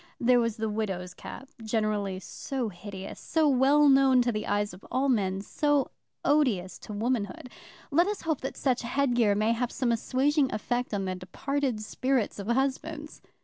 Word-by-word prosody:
There 245 Hz, 0 st, +4 dB
was 230 Hz, -2 st, 0 dB
the 220 Hz, 0 st, -1 dB
widow's 195 Hz, -5 st, -3 dB
cap, 265 Hz, +8 st, -10 dB
generally 215 Hz, -3 st, -1 dB
so 250 Hz, +4 st, -4 dB
hideous, 195 Hz, +1 st, -8 dB
so 320 Hz, -2 st, +1 dB
well 280 Hz, +2 st, +5 dB
known 270 Hz, -2 st, +5 dB
to 240 Hz, -, +1 dB
the 215 Hz, -1 st, -3 dB
eyes 205 Hz, -1 st, 0 dB
of 180 Hz, -, -13 dB
all 270 Hz, +2 st, +1 dB
men, 195 Hz, -5 st, +1 dB
so 290 Hz, +5 st, +1 dB, 0.3 s
odious 250 Hz, -12 st, +2 dB
to -, -, -10 dB
womanhood. 225 Hz, +1 st, -2 dB, 0.4 s
Let 340 Hz, +6 st, +4 dB
us 415 Hz, 0 st, -2 dB
hope 315 Hz, -4 st, -1 dB
that 265 Hz, -, -5 dB
such 255 Hz, -3 st, +1 dB
headgear 240 Hz, -4 st, +2 dB
may 215 Hz, +2 st, +2 dB
have 235 Hz, +1 st, -1 dB
some 250 Hz, -3 st, 0 dB
assuaging 270 Hz, +5 st, +1 dB
effect 245 Hz, +3 st, -2 dB
on 195 Hz, -1 st, -1 dB
the 185 Hz, -, -2 dB
departed 240 Hz, +7 st, -2 dB
spirits 255 Hz, 0 st, -1 dB
of 200 Hz, -, -6 dB
husbands. 275 Hz, +5 st, -2 dB
240 Hz, 170 wpm, -28 LUFS, 205-270 Hz, 0.4 s, well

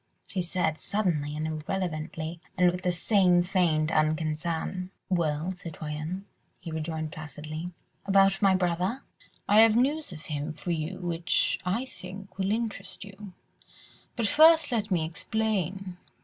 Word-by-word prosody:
she 190 Hz, -, -2 dB
said 170 Hz, -3 st, -1 dB
suddenly 155 Hz, -8 st, -1 dB
and 155 Hz, -, -2 dB
irrelevantly, 160 Hz, 0 st, -3 dB, 0.2 s
and 180 Hz, -1 st, +5 dB
with 180 Hz, +1 st, -5 dB
the 180 Hz, -, +1 dB
same 180 Hz, 0 st, +4 dB
feigned 170 Hz, -4 st, +2 dB
unconcern. 160 Hz, +3 st, 0 dB, 0.2 s
"Well, 165 Hz, -1 st, 0 dB
citoyenne?" 165 Hz, +1 st, -5 dB, 0.3 s
he 165 Hz, -, -7 dB
rejoined 160 Hz, 0 st, -3 dB
placidly. 155 Hz, +2 st, -6 dB, 0.4 s
"About 195 Hz, 0 st, +4 dB
my 195 Hz, -2 st, +5 dB
brother?" 185 Hz, +7 st, 0 dB, 0.4 s
"I 210 Hz, +1 st, +6 dB
have 225 Hz, -1 st, +7 dB
news 285 Hz, +3 st, +1 dB
of 155 Hz, -3 st, -10 dB
him 150 Hz, 0 st, -3 dB
for 165 Hz, +3 st, -4 dB
you 165 Hz, +3 st, -2 dB
which, 175 Hz, -1 st, 0 dB
I 225 Hz, +8 st, 0 dB
think, 195 Hz, -4 st, -10 dB
will 190 Hz, +1 st, +1 dB
interest 210 Hz, -4 st, -3 dB
you, 200 Hz, -1 st, -11 dB, 0.8 s
but 235 Hz, -, 0 dB
first 315 Hz, +4 st, +6 dB
let 220 Hz, -3 st, 0 dB
me 170 Hz, -5 st, +1 dB
explain. 190 Hz, 0 st, -2 dB
180 Hz, 135 wpm, -28 LUFS, 160-195 Hz, 0.8 s, have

